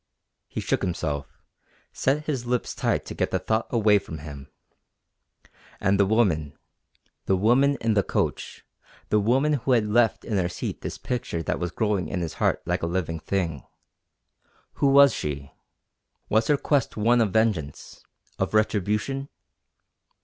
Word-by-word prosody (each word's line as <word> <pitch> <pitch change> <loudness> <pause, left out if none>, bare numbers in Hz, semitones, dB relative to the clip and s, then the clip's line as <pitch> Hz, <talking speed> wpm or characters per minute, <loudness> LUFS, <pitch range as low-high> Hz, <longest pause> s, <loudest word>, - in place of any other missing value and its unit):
He - - -5
shook - - 0
himself, 75 -6 -2 0.7
set 145 +3 0
his 130 -6 -3
lips 125 0 -1
tight - - -1
to - - -6
get - - -1
the - - 0
thought 110 0 -1
away 105 -3 +4
from 80 -4 -8
him. 70 -2 -9 1.3
And 100 +1 +2
the 100 - +4
woman 90 -10 +1 0.7
the 95 - +3
woman 130 +8 +3
in 115 -1 +2
the 100 - +3
coach, - - -3 0.4
the 105 - +3
woman 130 +8 +2
who 130 -1 +1
had 115 -3 +3
left 115 +2 +2
in 105 - -1
her 90 -2 +1
seat - - -5
this - - -5
picture 110 -9 -3
that - - -2
was 90 - -2
growing 105 0 -1
in 90 - -3
his 85 - -3
heart - - +1
like - - -1
a 85 - -1
living 85 -2 -2
thing 85 -6 -2 1.2
who 140 - +5
was 140 0 +7
she? 70 -2 -4 0.8
Was 110 +2 +2
her 150 - +3
quest 140 -4 0
one 115 +3 +3
of 110 -4 +1
vengeance 100 -10 -1 0.4
of - - -1
retribution? 110 +6 0
105 Hz, 155 wpm, -25 LUFS, 85-120 Hz, 1.3 s, was